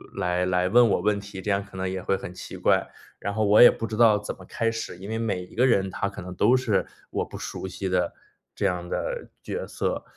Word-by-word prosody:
来 90 Hz, +1 st, 0 dB
来 90 Hz, 0 st, +1 dB
问 120 Hz, +3 st, +6 dB
我 -, -, +2 dB
问 105 Hz, -1 st, +1 dB
题， 100 Hz, -1 st, -8 dB
这 105 Hz, -, -4 dB
样 100 Hz, 0 st, +1 dB
可 100 Hz, -, -15 dB
能 95 Hz, 0 st, -2 dB
也 95 Hz, 0 st, -3 dB
会 95 Hz, -, +1 dB
很 90 Hz, -, -8 dB
奇 -, -, -9 dB
怪。 -, -, +2 dB, 0.3 s
然 100 Hz, +1 st, -3 dB
后 110 Hz, 0 st, +1 dB
我 105 Hz, +3 st, +6 dB
也 120 Hz, -, +11 dB
不 115 Hz, -, -4 dB
知 110 Hz, -, -4 dB
道 110 Hz, -2 st, +6 dB
怎 105 Hz, -, -6 dB
么 95 Hz, -, -14 dB
开 115 Hz, +4 st, -1 dB
始， 115 Hz, -5 st, -5 dB
因 95 Hz, +3 st, -9 dB
为 110 Hz, -, -2 dB
每 105 Hz, -5 st, -1 dB
一 -, -, -15 dB
个 125 Hz, +3 st, +4 dB
人， 95 Hz, -6 st, +2 dB
他 100 Hz, -, -2 dB
可 100 Hz, -, -9 dB
能 90 Hz, 0 st, -7 dB
都 120 Hz, +7 st, +4 dB
是 115 Hz, -5 st, +1 dB, 0.3 s
我 -, -, -1 dB
不 -, -, -9 dB
熟 -, -, -5 dB
悉 95 Hz, +1 st, -4 dB
的 90 Hz, -1 st, +1 dB, 0.4 s
这 -, -, -1 dB
样 90 Hz, -1 st, -1 dB
的 -, -, -3 dB
角 485 Hz, -, -4 dB
色。 -, -, -2 dB
100 Hz, 275 characters per minute, -26 LUFS, 90-115 Hz, 0.4 s, 也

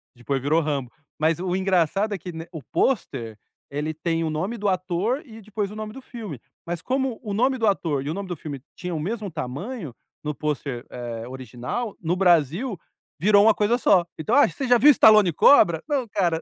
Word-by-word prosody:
Depois 135 Hz, +2 st, -2 dB
virou 155 Hz, +5 st, +2 dB
Rambo. 140 Hz, -5 st, -2 dB, 0.3 s
Mas 160 Hz, +1 st, +2 dB
o 180 Hz, 0 st, -1 dB
engraçado 190 Hz, +2 st, +1 dB
é -, -, -2 dB
que, 180 Hz, +1 st, -8 dB
né, 165 Hz, 0 st, -7 dB
o 160 Hz, -, -6 dB
pôster, 120 Hz, -, -1 dB, 0.3 s
ele 150 Hz, +3 st, -3 dB
tem 165 Hz, +1 st, -1 dB
o 160 Hz, -, -1 dB
nome 185 Hz, +10 st, -3 dB
do 205 Hz, -1 st, 0 dB
ator 185 Hz, -, -1 dB
e 225 Hz, -4 st, -12 dB
depois 210 Hz, -1 st, -3 dB
o -, -, -9 dB
nome 215 Hz, 0 st, -5 dB
do 265 Hz, -, -10 dB
filme. 215 Hz, -, -8 dB, 0.3 s
Mas, 170 Hz, 0 st, -4 dB
como 265 Hz, -2 st, -1 dB
o 210 Hz, -4 st, -5 dB
nome 255 Hz, +5 st, +2 dB
do 225 Hz, -2 st, +1 dB
ator 155 Hz, -8 st, 0 dB
e 145 Hz, -, -3 dB
o -, -, -1 dB
nome 195 Hz, -1 st, -5 dB
do 175 Hz, -, -3 dB
filme 145 Hz, -3 st, -7 dB, 0.2 s
tinham 180 Hz, -1 st, -4 dB
o -, -, -3 dB
mesmo 205 Hz, +4 st, -3 dB
tamanho 155 Hz, -, -5 dB, 0.3 s
no 150 Hz, -, -2 dB
pôster, 140 Hz, -4 st, -3 dB
eh, 120 Hz, -1 st, -6 dB
original, 130 Hz, -, -5 dB
no 170 Hz, +2 st, 0 dB
Brasil, 180 Hz, -, +2 dB, 0.4 s
virou 205 Hz, +4 st, +5 dB
uma 225 Hz, -, +6 dB
coisa 210 Hz, +4 st, +1 dB
só. 185 Hz, -7 st, +4 dB
Então: 215 Hz, +9 st, -2 dB
"Ah, 285 Hz, -, +6 dB
você 270 Hz, -3 st, -4 dB
já 245 Hz, 0 st, +6 dB
viu 285 Hz, +6 st, +7 dB
Stallone 215 Hz, -, +6 dB
Cobra?" 170 Hz, -, +5 dB
Não, 275 Hz, -5 st, -1 dB
cara. 175 Hz, -6 st, 0 dB
180 Hz, 210 wpm, -24 LUFS, 150-215 Hz, 0.4 s, viu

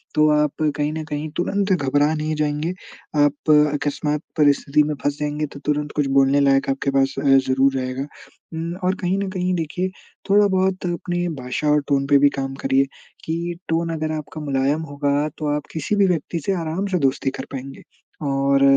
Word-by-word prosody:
तो 155 Hz, 0 st, +5 dB
आप 150 Hz, -1 st, +1 dB, 0.3 s
कहीं 150 Hz, 0 st, 0 dB
न 160 Hz, 0 st, -4 dB
कहीं 150 Hz, 0 st, -4 dB
तुरंत 195 Hz, +3 st, 0 dB
घबरा 145 Hz, -1 st, +2 dB
नहीं 155 Hz, 0 st, -2 dB
जाएँगे। 150 Hz, +3 st, -1 dB, 0.5 s
आप 145 Hz, +2 st, +1 dB, 0.2 s
अकस्मात 150 Hz, +1 st, -1 dB, 0.2 s
परिस्थिति 145 Hz, 0 st, +3 dB
में 150 Hz, +1 st, -1 dB
फँस 145 Hz, 0 st, 0 dB
जाएँगे 150 Hz, +1 st, -1 dB
तो -, -, -7 dB
तुरंत 150 Hz, 0 st, 0 dB
कुछ 145 Hz, -2 st, +2 dB
बोलने 135 Hz, +1 st, +4 dB
लायक 135 Hz, 0 st, +3 dB
आपके 135 Hz, 0 st, 0 dB
पास 135 Hz, 0 st, +2 dB
ज़रूर 135 Hz, 0 st, +4 dB
रहेगा। 130 Hz, +2 st, -3 dB, 0.5 s
उम, 165 Hz, +1 st, -3 dB
और 185 Hz, 0 st, -1 dB
कहीं 185 Hz, +1 st, 0 dB
न 200 Hz, -1 st, -2 dB
कहीं 185 Hz, -1 st, -1 dB
देखिए 180 Hz, +3 st, -2 dB, 0.4 s
थोड़ा-बहुत 190 Hz, -2 st, +3 dB
अपनी 175 Hz, 0 st, -2 dB
भाषा 125 Hz, +4 st, -2 dB
और 150 Hz, 0 st, +4 dB
टोन 140 Hz, -1 st, +1 dB
पे 145 Hz, 0 st, +6 dB
भी 145 Hz, 0 st, +6 dB
काम 135 Hz, 0 st, -3 dB
करिए 135 Hz, +1 st, +3 dB, 0.4 s
कि 170 Hz, +2 st, -2 dB
टोन 165 Hz, +1 st, 0 dB
अगर 155 Hz, -1 st, -2 dB
आपका 155 Hz, 0 st, -6 dB
मुलायम 140 Hz, +1 st, 0 dB
होगा 145 Hz, +1 st, 0 dB
तो 155 Hz, -, -3 dB
आप 150 Hz, -, -4 dB
किसी 160 Hz, +6 st, -1 dB
भी 200 Hz, -1 st, +4 dB
व्यक्ति 170 Hz, -1 st, -1 dB
से 195 Hz, -, +1 dB
आराम 170 Hz, +3 st, -2 dB
से 190 Hz, -2 st, 0 dB
दोस्ती 135 Hz, -1 st, +1 dB
कर -, -, -4 dB
पाएँगे। 135 Hz, 0 st, -7 dB, 0.5 s
और 140 Hz, 0 st, +2 dB
150 Hz, 180 wpm, -22 LUFS, 140-170 Hz, 0.5 s, पे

